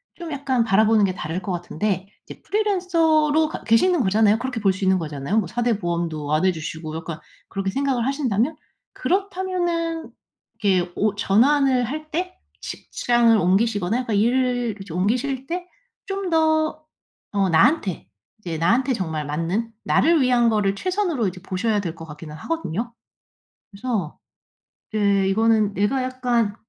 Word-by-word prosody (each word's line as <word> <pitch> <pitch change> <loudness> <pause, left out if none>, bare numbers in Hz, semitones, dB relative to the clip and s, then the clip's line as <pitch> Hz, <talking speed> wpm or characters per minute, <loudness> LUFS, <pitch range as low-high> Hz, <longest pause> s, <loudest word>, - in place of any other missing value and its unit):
좀 340 -2 -7
약간 270 -4 0
바라보는 220 0 +4
게 185 - -1
다를 165 0 -4
것 190 - -4
같은데 185 +2 -2 0.2
이제 - - -11
프리랜서로 330 -7 +2
가 - - -7
계시는 280 +9 +3
거잖아요. 210 +1 +3
그렇게 250 -2 -3
볼 195 -2 +3
수 185 - -6
있는 190 0 +3
거잖아요. 150 +4 -3
뭐 195 - -2
4 240 +8 -2
대 230 -4 +1
보험도 170 -5 -2
안 155 +4 +2
해 190 - +4
주시고 160 -1 -6
약간 165 0 -6 0.3
그렇게 195 0 -2
생각을 265 -1 0
하신다면 270 0 0 0.4
그렇다면은 355 -4 -1 0.5
이렇게 185 -4 +2
오 210 -1 +1
전환을 250 +5 +3
할 305 +5 -6
때 365 +3 -3 0.3
직장을 240 -1 +1
옮기시거나 205 +2 +1
약간 235 -4 -2
일을 245 +1 +1
그렇지 195 -5 -9
옮기실 250 +8 -1
때 355 +1 -4 0.4
좀 390 -1 -3
더 315 -1 +2 0.5
어 200 -1 +2
나한테 185 - +2 0.3
이제 170 -6 -5
나한테 235 - +2
정말 160 -9 -2
맞는 170 +10 -2
나를 330 0 +4
위한 245 -2 +4
거를 205 -3 +1
최선으로 360 - 0
이제 185 0 -11
보셔야 205 +3 -1
될 170 -5 -4
것 165 - -10
같기는 150 0 -10
하거든요. 235 - -3 0.8
그래서 200 -5 -3 0.7
이제 200 -2 +2
이거는 215 0 +2
내가 230 +7 +1
약간 245 -4 0
225 Hz, 330 characters per minute, -22 LUFS, 190-280 Hz, 0.8 s, 바라보는